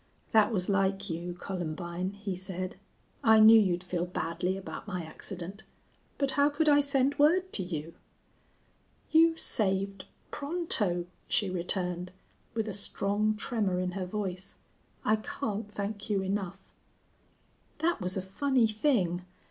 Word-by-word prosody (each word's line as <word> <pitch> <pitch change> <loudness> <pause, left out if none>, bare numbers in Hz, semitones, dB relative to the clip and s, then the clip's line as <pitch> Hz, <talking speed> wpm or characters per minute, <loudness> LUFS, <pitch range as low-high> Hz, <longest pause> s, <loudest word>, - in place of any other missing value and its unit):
"That 215 -1 +5
was 185 -5 0
like 195 -1 +1
you, 175 +2 -4
Columbine," 175 +1 -4
he 200 -2 -4
said. 185 0 -5 0.5
"I 220 -1 +7
knew 220 +1 +9
you'd 180 -3 0
feel 180 -1 -2
badly 180 +2 -2
about 195 +2 -7
my 180 -4 -3
accident. 185 +4 -6 0.6
But 275 -1 +1
how 285 +1 +4
could 305 +2 0
I 290 -1 +6
send 280 0 +2
word 365 +6 +4
to - - +3
you?" 165 -3 -5 1.2
"You 325 +1 +5
saved 195 -6 0 0.3
Pronto," 280 - +1 0.2
she 200 -3 +1
returned, 180 0 -1 0.4
with 225 -1 -1
a 210 - -3
strong 205 +2 0
tremor 205 -5 -1
in 180 0 -1
her 185 0 -4
voice. 190 -1 -4 0.5
"I 215 +1 +4
can't 210 0 -4
thank 205 0 -4
you 200 -2 +1
enough." 195 -1 -4 1.1
"That 325 -5 0
was 185 +1 -1
a 185 - -2
funny 255 +6 +2
thing. 215 - +1
195 Hz, 140 wpm, -30 LUFS, 180-220 Hz, 1.2 s, knew